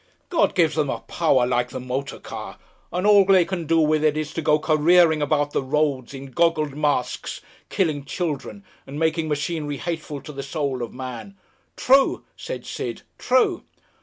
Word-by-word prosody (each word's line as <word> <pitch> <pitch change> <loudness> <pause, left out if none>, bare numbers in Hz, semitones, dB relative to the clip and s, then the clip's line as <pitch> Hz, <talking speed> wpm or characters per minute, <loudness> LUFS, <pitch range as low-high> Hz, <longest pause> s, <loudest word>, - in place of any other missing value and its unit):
God 345 - +2
gives 165 -4 +3
them 150 -3 0
a - - -3
power 140 -7 +2
like 125 0 0
the - - -6
motor 130 +2 -4
car, - - -8 0.3
and 180 +3 -2
all 205 -1 +7
they 190 -2 +5
can 170 -3 -4
do 165 +1 +3
with 155 -1 +2
it 155 -1 +2
is 155 0 -3
to 165 - -3
go 150 0 +3
careering 160 +1 +4
about 145 0 +1
the - - 0
roads 140 -2 -1
in 135 0 -9
goggled 155 -2 +1
masks 145 -4 -1 0.3
killing 155 -6 0
children 165 +5 -4 0.2
and 140 - -7
making 160 0 0
machinery 150 -1 -2
hateful 160 -2 -4
to 150 - -10
the 140 - -5
soul 140 -2 -3
of 120 - -4
man! 130 - -8 0.4
("True," 270 +1 +3
said - - -7
Sid, - - -5 0.2
"true.") 255 0 +2
155 Hz, 175 wpm, -23 LUFS, 140-170 Hz, 0.4 s, all